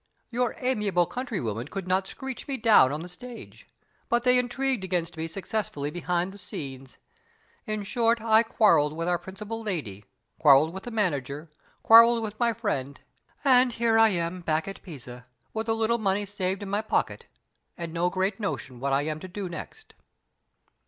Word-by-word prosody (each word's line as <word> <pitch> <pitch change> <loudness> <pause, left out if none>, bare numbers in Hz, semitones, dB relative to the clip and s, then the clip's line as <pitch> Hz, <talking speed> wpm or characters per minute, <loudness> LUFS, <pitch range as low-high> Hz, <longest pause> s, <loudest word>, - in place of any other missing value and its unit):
Your 245 0 0
amiable 210 -9 +1
countrywomen 165 - -4
could 190 +3 -6
not 190 +1 +1
screech 265 +5 -6
me 275 -2 -2
down 220 - +6
on 150 +3 -4
the - - -7
stage, 240 +7 -10 0.4
but 240 0 +2
they 250 0 +5
intrigued 250 -2 0
against 175 -2 -2
me 160 0 -3
successfully 170 -5 -3
behind 175 +2 -1
the 200 - -11
scenes. 135 -7 -7 0.7
In 215 -1 -2
short, 230 +2 +1
I 220 0 +5
quarreled 215 -10 +3
with 165 +2 -3
our 175 -1 +1
principal 210 +4 -7
lady, 140 - -4 0.3
quarreled 150 +2 +6
with 190 - -8
the - - -4
manager, 150 - -2 0.3
quarreled 230 +1 +7
with 215 -1 -6
my 235 -1 +3
friend; 145 - -3 0.5
and 255 -2 +5
here 225 -1 +2
I 225 0 +7
am 175 -1 -2
back 160 0 0
at 195 - -7
Pisa, 125 -7 -10 0.3
with 225 +1 -3
a 225 - +3
little 225 +1 +1
money 205 -1 0
saved 195 -1 -3
in 200 - -6
my 205 +1 +1
pocket, 220 - -1 0.5
and 170 -2 -5
no 175 +1 +1
great 190 +3 -1
notion 135 - -4
what 135 +1 -1
I 140 +1 +2
am 155 0 -3
to 185 - -8
do 190 +1 -5
next." 435 - -9
195 Hz, 175 wpm, -27 LUFS, 160-225 Hz, 0.7 s, quarreled